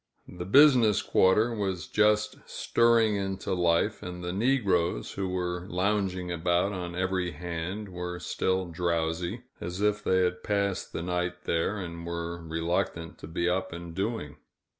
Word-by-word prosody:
The 90 -1 -7
business 125 -2 +6
quarter 110 +5 +3
was 95 -5 -2
just 105 0 +2
stirring 115 -3 +3
into 95 -1 -2
life; 90 +4 +2
and 90 0 -7
the 90 0 -3
negroes 95 - +1
who 95 -1 -3
were 90 -1 -2
lounging 95 -1 0
about 85 +3 +1
on 90 -3 -5
every 90 -1 -1
hand 90 +5 -4
were 90 -1 -5
still 95 +1 -1
drowsy, 85 0 -1 0.2
as 90 +2 -5
if 105 0 +1
they 95 0 +3
had 90 0 -1
passed 100 -2 -1
the 85 - -4
night 90 0 -2
there, 85 +5 0
and 85 -3 -6
were 85 0 -4
reluctant 80 +1 -2
to - - -8
be 85 +2 -1
up 95 +1 0
and 85 0 -7
doing. 95 -5 -3
90 Hz, 150 wpm, -28 LUFS, 85-100 Hz, 0.2 s, business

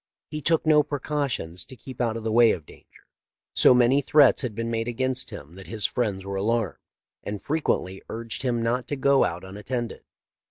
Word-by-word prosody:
He 150 0 -4
took 165 +3 +2
no 155 -1 +6
precautions 140 - -3
to 130 - -11
keep 130 +1 -8
out 115 -2 0
of 115 - -7
the 110 - -1
way 115 0 +6
of 80 - -7
danger. - - -18 0.5
So 125 - +6
many 125 +3 +4
threats 145 0 +5
had 125 -6 -3
been 115 +1 -3
made 115 0 -1
against 130 +1 -2
him 75 +3 -10
that 95 +1 -12
his 110 -2 +2
friends 100 -6 -1
were 100 0 -3
alarmed, 110 0 0 0.4
and 105 0 -4
frequently 120 - -1
urged 115 0 -4
him 120 -3 0
not 120 +2 0
to 145 - -2
go 140 0 +4
out 85 +2 -2
unattended. 110 +5 -5
120 Hz, 195 wpm, -25 LUFS, 105-130 Hz, 0.5 s, no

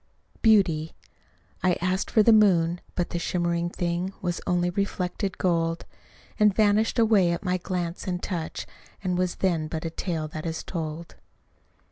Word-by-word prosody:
Beauty 180 -8 +3 0.7
I 185 -1 +3
asked 185 +1 -1
for 215 - +4
the 230 - +6
moon 175 -5 +4
but 175 - -1
the 170 - -2
shimmering 175 0 -1
thing 175 +2 -2
Was 175 -2 -2
only 175 0 +1
reflected 190 0 -2
gold, 165 -2 0 0.5
And 210 -1 +6
vanished 215 +2 +3
away 215 -6 +4
at 170 - -5
my 180 0 +1
glance 175 -1 -4
and 180 -1 0
touch, 170 -4 -4 0.4
And 180 -2 0
was 180 0 0
then 170 -5 0
but 160 +1 -5
a 165 - -3
tale 165 -2 -3
that 155 +1 -5
is 160 0 -4
told. 165 -1 -6
180 Hz, 155 wpm, -26 LUFS, 170-190 Hz, 0.7 s, the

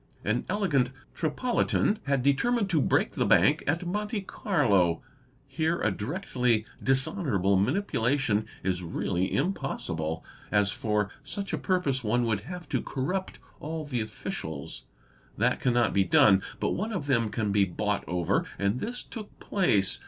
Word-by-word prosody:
An 110 +4 0
elegant 170 -11 +2 0.2
Tripolitan 210 +5 +1
had 135 -2 +1
determined 200 - +2
to 160 -4 +3
break - - +2
the - - 0
Bank - - +4
at 165 +5 0
Monte 210 +3 -2
Carlo. 105 - +1 0.4
Here 160 +5 0
a 105 - +1
directly 125 - 0 0.2
dishonourable 135 - +1
manipulation 120 - +1 0.2
is 90 -1 0
really 90 +2 -1
impossible, 80 - -2 0.3
as 105 -2 +3
for 105 -3 -1
— 140 - -29
such 200 0 -4
a - - +1
purpose 145 -9 0
one 120 +3 +2
would 110 -4 +1
have 180 -1 -7
to - - 0
corrupt 180 +8 -3 0.2
all 155 +1 -4
the 125 -5 -2
officials. 80 -8 -6 0.5
That 125 +4 +2
cannot 120 -4 +2
be 100 - +4
done, 95 +1 +5 0.2
but - - 0
one 215 +5 -2
of 185 -9 -3
them 115 -6 +2
can 105 -2 -1
be 100 0 +4
bought 105 +3 -1
over, 90 -1 +1
and 100 +5 0
this 245 - -4
took 215 -4 -10
place. 100 - +2
125 Hz, 150 wpm, -28 LUFS, -, 0.5 s, done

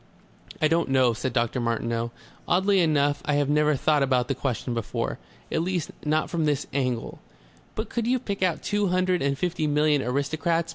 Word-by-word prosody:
"I 155 - +4
don't 165 -1 +1
know," 130 -3 +4
said 125 +3 -3
Dr. 120 +1 0
Martineau. 115 0 -1 0.4
"Oddly 190 +2 +3
enough, 145 -4 +2
I 150 - +1
have 145 -1 +1
never 150 0 +3
thought 150 +2 +2
about 130 -2 +1
that 135 -1 -2
question 125 -2 -2
before. 115 -2 -3 0.3
At 160 - +1
least, 175 -2 -2
not 155 +1 +1
from 165 -2 -1
this 145 -3 0
angle." 125 -4 -2 0.6
"But 220 0 -3
could 235 -1 -2
you 255 +1 +3
pick 200 -6 -5
out 180 -4 +1
two 205 -1 +1
hundred 185 0 +1
and 140 0 0
fifty 170 -1 -1
million 150 -1 +3
aristocrats?" 155 +6 0
150 Hz, 185 wpm, -26 LUFS, 130-175 Hz, 0.6 s, I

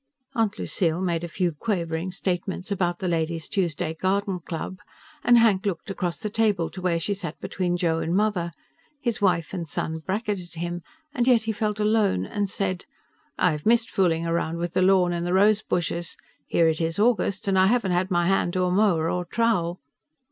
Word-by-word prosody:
Aunt 220 -4 0
Lucille 170 -5 0
made 175 -3 -1
a - - -3
few 175 +1 -1
quavering 170 -1 -2
statements 185 +1 -3
about 175 -3 0
the 185 - -3
Ladies' 165 -1 -1
Tuesday 165 -4 -1
Garden 190 +2 -1
Club, 175 +3 -6 0.4
and 240 0 +6
Hank 220 -5 +4
looked 195 +1 -3
across 180 -3 -2
the 210 -2 -4
table 210 -6 +1
to 185 - -8
where 175 -2 +1
she 200 +5 -1
sat 175 -6 -6
between 175 -2 -1
Joe 165 -2 +1
and 165 +2 -1
Mother 205 -4 +1 0.5
his 235 -5 -2
wife 180 -4 +1
and 170 -3 -4
son 160 +1 -3
bracketed 190 -1 -3
him, 175 +1 -4 0.3
and 245 0 0
yet 240 -4 +5
he 220 - -1
felt 210 0 -2
alone 210 - +2
and 200 - -2
said, 185 -2 -2 0.5
"I've 155 -2 +1
missed 230 +1 +3
fooling 170 -3 +1
around 165 0 -1
with 170 0 -3
the - - +2
lawn 185 -2 +4
and 170 0 -2
the 175 +1 -1
rose 205 +2 +4
bushes. 175 -3 -2 0.3
Here 165 - +3
it 160 0 0
is 165 0 -1
August 205 -3 +1
and 195 - +2
I 190 - +5
haven't 215 -4 +2
had 180 +1 +1
my 175 -2 +2
hand 180 -1 +1
to 185 - +1
a 180 - +1
mower 180 -5 +3
or 180 +1 -1
trowel." 180 -4 0
180 Hz, 195 wpm, -25 LUFS, 170-205 Hz, 0.5 s, and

